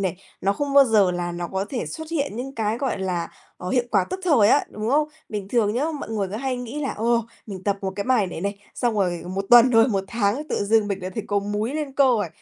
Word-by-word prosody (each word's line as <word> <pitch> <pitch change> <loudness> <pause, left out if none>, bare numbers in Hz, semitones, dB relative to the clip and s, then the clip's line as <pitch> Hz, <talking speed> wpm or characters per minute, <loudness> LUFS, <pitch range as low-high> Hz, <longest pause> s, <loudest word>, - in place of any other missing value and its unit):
này, 190 -2 -1 0.2
nó 195 +2 +2
không 285 +6 -3
bao 280 -1 +8
giờ 215 -6 +4
là 175 -1 -3
nó 175 0 -4
có 190 +2 -2
thể 255 - -3
xuất 320 0 -7
hiện 285 -8 -2
những 265 +3 -5
cái, 220 -1 -1
gọi 270 -5 -1
là, 180 -3 -2 0.3
ờ, 180 - -6
hiệu 245 +2 +2
quả 195 -4 +3
tức 375 - -4
thời 265 - +5
á, 285 - +4
đúng 215 +1 -4
không? 300 +2 +3 0.2
Bình 205 -2 -5
thường 215 -2 +1
nhá, 255 +5 +1 0.2
mọi - - -6
người 205 -3 -1
cứ 200 - -5
hay 260 +2 -2
nghĩ 245 +4 -5
là, 275 - -2
ồ, 230 +1 +1 0.2
mình 195 -4 -7
tập 200 -1 +1
1 190 -1 -2
cái 200 - -2
bài 250 -6 +2
này 175 - -6
này, 200 +2 -3 0.2
xong 240 -2 0
rồi 180 -4 0
1 195 +2 -3
tuần, 240 +1 +8
rồi 225 +1 +5
1 195 -4 -1
tháng 235 +6 -1
tự - - -1
dưng 215 0 +3
mình 195 -2 -3
lại 185 - -4
thấy 220 - -3
có 205 - +1
múi, 205 +5 -2
lên 300 -3 -3
cơ 280 +1 +4
rồi. 225 -8 +2
215 Hz, 275 wpm, -23 LUFS, 195-255 Hz, 0.3 s, bao